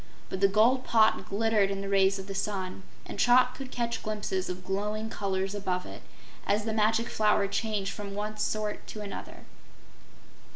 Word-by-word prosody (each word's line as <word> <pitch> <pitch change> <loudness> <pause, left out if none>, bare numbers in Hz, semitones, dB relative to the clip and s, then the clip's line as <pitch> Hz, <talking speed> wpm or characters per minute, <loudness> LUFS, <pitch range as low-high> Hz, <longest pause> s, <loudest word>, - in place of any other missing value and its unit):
But 190 - -4
the 195 - +7
gold 230 +6 +4
pot 220 -4 +3
glittered 210 -1 +2
in 195 0 -3
the 195 - -4
rays 195 0 +3
of 195 - -6
the 195 - -6
sun, 190 -1 -3 0.2
and - - -8
Trot 250 +1 +5
could 265 0 -7
catch 235 -2 -2
glimpses 205 -3 -2
of 180 0 -6
glowing 210 +3 -2
colors 195 -1 -1
above 185 -3 -2
it, - - -9 0.5
as 210 +1 +2
the 220 - -1
Magic 220 +2 +2
Flower 210 -2 +2
changed 200 -1 -1
from 200 -1 -6
one 210 +1 -3
sort 210 0 -2
to 215 - -7
another. 205 -1 -7
210 Hz, 175 wpm, -29 LUFS, 195-220 Hz, 0.5 s, the